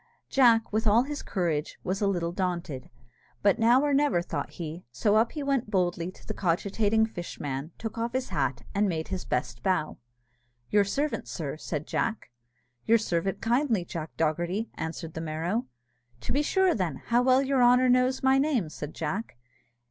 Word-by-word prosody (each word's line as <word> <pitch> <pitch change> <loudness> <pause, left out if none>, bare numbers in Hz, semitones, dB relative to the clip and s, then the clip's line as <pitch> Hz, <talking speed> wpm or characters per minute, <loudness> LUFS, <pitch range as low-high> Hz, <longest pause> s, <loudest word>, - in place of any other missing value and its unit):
Jack, 230 -5 +4
with 220 +1 +1
all 220 +4 +5
his 290 +2 -5
courage, 165 -6 -2
was 190 +3 -2
a 200 - +3
little 175 -3 0
daunted; 175 -7 -3 0.5
but 200 -2 +4
now 240 +4 +5
or 290 -1 +2
never, 275 -11 +3
thought - - -4
he; 165 +1 -6
so 205 - +2
up 225 +2 +3
he 300 - -4
went 275 -5 0
boldly 180 -3 0
to 185 - -15
the - - -3
cogitating 205 +5 +1
fishman, 150 -8 -5
took 225 0 -5
off 235 +1 -2
his 260 0 -2
hat, 140 -6 -1
and 205 0 +2
made 160 -2 -3
his 190 -1 -4
best 125 -1 -2
bow. 165 0 0 0.7
"Your 205 -1 +4
servant, 285 +9 -2
sir," 150 -5 -4
said 155 -1 -4
Jack. 225 - -2 0.6
"Your 230 - +6
servant, 190 -3 -1
kindly, 235 -5 +1
Jack 165 -2 -5
Dogherty," 175 +7 -1
answered 160 0 -5
the 160 - -5
Merrow. 165 +9 -2 0.5
"To - - -4
be 285 - +3
sure, 375 +3 +3
then, 180 -8 -1
how 240 +1 +3
well 260 +1 +4
your 270 -1 +2
honour 250 +1 +6
knows 255 +1 +3
my 265 0 +5
name!" 270 - +1
said 150 0 -7
Jack. 160 - -4
200 Hz, 180 wpm, -28 LUFS, 165-245 Hz, 0.7 s, Your